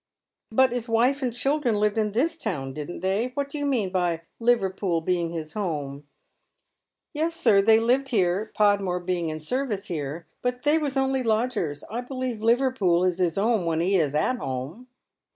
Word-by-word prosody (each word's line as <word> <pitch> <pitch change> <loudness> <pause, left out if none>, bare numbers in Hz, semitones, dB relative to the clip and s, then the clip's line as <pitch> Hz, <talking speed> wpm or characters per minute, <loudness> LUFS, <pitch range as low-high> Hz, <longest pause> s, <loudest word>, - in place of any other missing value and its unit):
" - - -64
But 260 +2 +4
his 240 -1 -4
wife 250 +5 +2
and 255 -2 0
children 250 -2 0
lived 210 0 +2
in 215 -2 0
this 310 +9 +1
town, 150 - -4
didn't 150 +4 -6
they? 195 +6 0
What 280 0 -2
do 295 - -5
you 290 - -1
mean 225 -9 0
by 175 -3 0 0.2
Liverpool 195 -7 +1
being 170 0 -1
his 160 -2 -6
home? 150 -8 -4 0.3
" - - -51
" - - -61
Yes, 320 +2 -1
sir, 225 -12 +4
they 220 +2 +5
lived 255 +4 +1
here, 200 -1 +1
Podmore 200 -4 +2
being 175 -2 -2
in 155 0 -4
service 210 - -2
here, 155 -1 -4 0.2
but 250 0 -2
they 300 +2 +3
was 285 -3 -2
only 265 0 +1
lodgers. 220 - -1
I 235 +3 -5
believe 255 -3 -4
Liverpool 230 -7 +2
is 185 -1 +1
his 175 -2 +1
'ome 215 -1 +2
when 165 -1 0
he 185 +4 +2
is 150 -4 0
at 245 +12 0
'ome." 135 - -5
210 Hz, 190 wpm, -25 LUFS, 175-250 Hz, 0.3 s, they